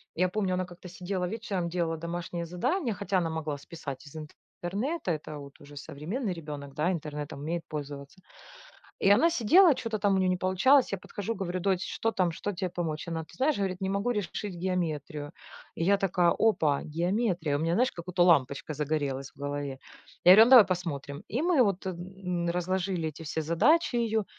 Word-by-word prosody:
я 185 +2 +2
помню, 190 0 -1
она 185 0 -1
как-то 180 +1 -12
сидела 180 0 -3
вечером, 195 -5 -3
делала 170 -1 -1
домашнее 170 +1 -4
задание, 225 - -1
хотя 200 -1 -1
она 170 -2 -1
могла 155 -2 -3
списать 140 -1 -8
из 145 - -13 0.5
интернета, 205 - -2
это 155 -1 -5
вот 140 -1 -10
уже 145 0 -13
современный 165 - -4
ребенок, 145 -4 -8
да, 155 +5 +1
интернетом 150 -4 -5
умеет 165 +4 -3
пользоваться. 145 +2 -7 0.9
И - - +7
она 235 +12 +6
сидела, 330 - +6
чё-то 225 -3 -3
там 200 -1 +2
у - - +2
нее 190 -1 +2
не 185 - +2
получалось, 190 +10 +4
я 195 - -1
подхожу 205 +4 -5
говорю: 185 -2 -3
"Дочь, 190 -1 +1
что 225 0 0
там, 180 -4 +1
что 205 - -3
тебе 185 -1 -3
помочь?" 165 -3 -4
Она, 165 -1 -2
ты 160 - -14
знаешь, 280 +3 +2
говорит: 190 -2 -2
"Не 190 - -1
могу 200 +5 0
решить 205 -2 -3
геометрию." 155 -5 -3 0.4
И - - -2
я 200 +1 +4
такая: 180 -3 +2
"Опа, 160 -11 +2
геометрия!" 175 -1 0
У - - -4
меня, 165 +1 +1
знаешь, 250 +5 +2
как-будто 175 +1 0
лампочка 145 -3 +2
загорелась 140 -2 -2
в - - -26
голове. 145 -1 -4 0.5
Я 180 - +10
говорю: 215 +3 +9
"Ну, 245 - +1
давай 245 -6 +10
посмотрим." 155 -6 -4
И 245 - -1
мы 330 -6 +4
вот 195 -3 -1
н 180 -1 -4
разложили 180 -1 -1
эти 155 +1 -8
все 160 +1 -2
задачи 235 - +3
ее 225 -3 +1
180 Hz, 190 wpm, -29 LUFS, 155-200 Hz, 0.9 s, Я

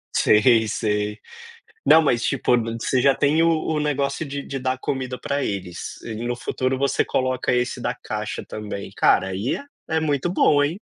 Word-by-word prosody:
Sei, 110 +1 +4
sei. 105 -1 -1 0.7
Não, 160 - +7
mas 120 -6 +1
tipo, 125 - +2 0.2
você 125 +1 +1
já 135 0 +4
tem 145 +4 +2
o 165 - +4
o 160 -1 0
negócio 140 0 -1
de 140 0 -5
de 135 - -5
dar 130 0 -1
comida 130 -1 -3
para 140 -1 -2
eles, 90 -4 -5
e 115 -2 -6
no 120 0 -1
futuro 130 +2 -2
você 140 +1 +1
coloca 130 -1 0
esse 125 0 -1
da - - -1
caixa 105 0 -5
também. 105 -2 -6
Cara, 95 - +3
aí 95 +6 -2
é 280 - -8 0.2
é 160 0 +1
muito 150 +1 0
bom, 145 -5 +4
hein. 170 +9 -2
130 Hz, 180 wpm, -23 LUFS, 110-145 Hz, 0.7 s, Não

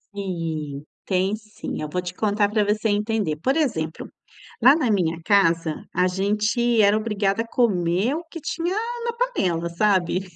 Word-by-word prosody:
Sim, 165 -7 -4 0.2
tem 190 +2 +1
sim, 215 -6 -7
eu 150 - -4
vou 180 - -2
te 180 0 -5
contar 205 -1 +1
para 210 0 +1
você 210 +2 0
entender. 205 -5 0
Por 265 - 0
exemplo, 165 - -1 0.5
lá 270 - +8
na 275 -9 +1
minha 170 -4 0
casa, 165 -6 +2
a 180 +1 +2
gente 210 +5 +1
era 205 +1 +5
obrigada 210 -1 0
a 230 - -6
comer 200 0 +1
o 330 +2 -3
que 330 - -7
tinha 340 +4 -2 0.3
na 470 - 0
panela, 185 - -1
sabe. 185 -1 +1
205 Hz, 160 wpm, -23 LUFS, 175-225 Hz, 0.5 s, lá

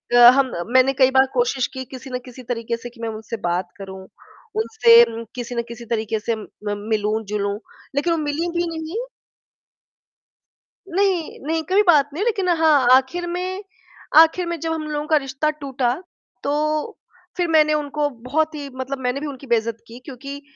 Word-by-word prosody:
अ, 240 0 +10
हम 270 -2 +2 0.2
मैंने 260 +1 +5
कई 260 -1 +4
बार 265 0 +5
कोशिश 475 - +1
की 260 - -5
किसी 265 +1 -10
ना 250 - -2
किसी 250 +1 -11
तरीक़े 235 -1 -3
से 240 +1 -8
कि 235 -1 -16
मैं 230 - -2
उनसे 220 +1 -6
बात 175 +1 -1
करूँ, 190 -1 -9 0.5
उनसे 465 +2 +6 0.3
किसी 245 0 -5
न 235 - +1
किसी 235 0 -9
तरीक़े 220 -1 -1
से 225 +1 -1
म 215 - -9 0.4
मिलूँ-जुलूँ 210 -1 -1 0.4
लेक़िन 335 +4 +1
वो 330 - -1
मिली 300 +4 -1
भी 345 0 +1
नहीं। 320 +5 -5 1.9
नहीं, 370 -2 0
नहीं 320 0 0
कभी 390 +3 +5
बात 295 -4 +5
नहीं 360 - -2
हुई - - -1
लेक़िन 390 -5 -1
हाँ, 305 -6 +4
आख़िर 270 +7 +1
में 370 +3 -3 0.5
आख़िर 330 +2 +6
में 340 -1 -3
जब 325 +2 -2
हम 320 -1 -3
लोगों 300 0 -3
का 310 -1 +4
रिश्ता 270 +2 -1
टूटा 270 -5 -1 0.5
तो 280 - 0 0.9
फ़िर 355 -1 +1
मैंने 305 -1 +5
उनको 295 0 -1
बहुत 290 +6 -2
ही 285 -2 -6
मतलब 265 +1 -4
मैंने 250 +2 0
भी 305 - -3
उनकी 275 -1 -8
बेइज़्ज़त 230 -1 0
की 235 +2 -11
क्योंकि 275 +2 -8
275 Hz, 180 wpm, -21 LUFS, 240-320 Hz, 1.9 s, अ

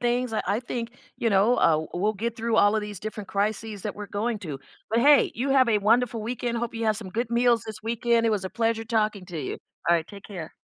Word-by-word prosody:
things, 245 0 0
I 220 - 0
I 205 +4 +1
think, 240 -1 -5 0.3
you 230 - +1
know, 205 +5 +4
uh 160 -5 +3
we'll 210 +3 +2
get 230 +3 -3
through 230 0 -1
all 205 +1 +5
of - - +1
these 205 -2 -7
different 215 -2 -6
crises 210 0 -2
that 210 - -4
we're 205 -1 -6
going 220 +3 -2
to. 150 -8 -6 0.3
But 225 +2 +2
hey, 285 +3 +5
you 265 +4 -1
have 260 -3 +5
a 215 -2 +3
wonderful 230 +2 +2
weekend, 235 +1 -2
hope 235 -1 -3
you 225 0 -2
have 215 -1 +2
some 205 -4 -7
good 230 +4 -2
meals 235 -1 +3
this 215 0 -7
weekend, 230 +1 +1
it 225 - +3
was 205 -3 -1
a 190 - -4
pleasure 225 -1 0
talking 215 -4 0
to 175 -3 -6
you. 130 - -4 0.3
Alright, 170 -1 +3
take 200 -1 -11
care. 175 -6 -8
220 Hz, 245 wpm, -26 LUFS, 205-235 Hz, 0.3 s, all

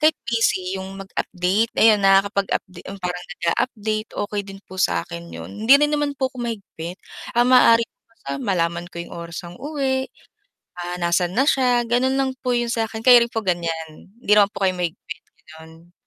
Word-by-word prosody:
kahit 310 0 +5 0.2
busy 195 -5 0
'yung 190 +1 -8
mag-update, 195 +3 -1
ayan, 215 -2 +6
nakakapag 195 0 +3
update 185 - -5 0.2
parang 180 0 -4 0.2
nag-a-update, 215 +2 -1 0.2
okey 205 -1 -2
din 195 0 -10
po 190 - -10
sakin 85 - -1
'yun, 85 +1 -8 0.2
hindi 255 - +7
rin 295 - +4
naman 295 -1 0
po 265 - +1
ako - - -15
mahigpit. 195 -6 -6 0.4
Ang 240 +1 +4
maaari 230 -2 +6
ko - - -64 0.5
malaman 170 -3 0
ko - - -13
'yung 170 - -8
oras 170 0 -6
ang 175 0 -10
uwi, 270 -3 -1 0.8
ah, 175 0 -4
nasan 175 +1 +1
na 270 +3 +2
siya 250 -3 +3
ganon 250 +3 +1
lang 265 -1 +1
po 250 - 0
yung 240 0 0
sakin. 225 -1 -2
Kayo 245 -1 +8
rin 235 - -6
po 225 - -1
ganyan, 165 -3 -3
hindi 210 - -3
naman 205 -1 +5
po 200 - -1
kayo 185 - +1
mahigpit, 170 -2 -5 0.3
ganon? 160 +2 -16
195 Hz, 180 wpm, -22 LUFS, 175-240 Hz, 0.8 s, Kayo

